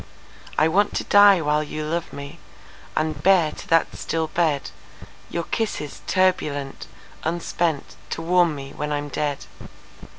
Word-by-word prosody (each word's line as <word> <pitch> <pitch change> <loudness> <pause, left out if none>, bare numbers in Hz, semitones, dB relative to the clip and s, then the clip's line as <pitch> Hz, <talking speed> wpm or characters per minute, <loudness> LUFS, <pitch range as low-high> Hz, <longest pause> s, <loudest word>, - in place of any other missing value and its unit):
I 155 - +5
want 200 +5 +2
to - - 0
die 205 -3 +7
while 150 0 +2
you 155 0 -4
love 170 +2 -2
me, 140 +4 -8 0.6
And 155 -2 -1
bear 175 -3 +4
to - - -10
that 165 0 +2
still 165 -1 -2
bed, 155 -3 0 0.6
Your 170 - -2
kisses 210 -8 -3
turbulent, 150 -7 0 0.4
unspentTo 165 -2 -2
warm 175 -2 +3
me 140 -1 -8
when 150 0 -4
I'm 145 0 -2
dead. 145 0 -2
160 Hz, 135 wpm, -23 LUFS, 150-175 Hz, 0.6 s, die